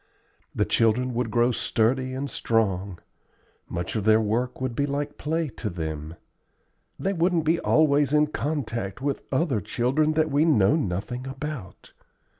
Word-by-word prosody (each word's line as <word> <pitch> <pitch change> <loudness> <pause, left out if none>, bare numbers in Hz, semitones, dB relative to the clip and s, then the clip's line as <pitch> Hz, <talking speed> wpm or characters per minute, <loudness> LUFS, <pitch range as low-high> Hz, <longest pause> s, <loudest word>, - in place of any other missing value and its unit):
The - - +2
children 120 +3 +2
would 120 -1 -1
grow 120 +3 +3
sturdy 130 +3 0
and 140 +2 -3
strong; 100 -7 0 0.7
much 85 +4 -4
of 110 - -1
their 110 +1 +5
work 115 +4 -1
would 130 -2 -3
be 140 +3 0
like 145 +1 -3
play 160 +2 -1
to 110 - -3
them; 80 -2 -5 0.8
they 195 - -1
wouldn't 170 -2 +1
be 165 +2 +2
always 145 -2 +3
in 150 0 +4
contact 125 -10 -3
with 140 0 -2
other 135 - +1
children 135 - +1
that 155 -1 +1
we 145 +2 +3
know 110 -11 +4
nothing 120 - -3
about. 135 -7 -7
125 Hz, 150 wpm, -25 LUFS, 110-150 Hz, 0.8 s, their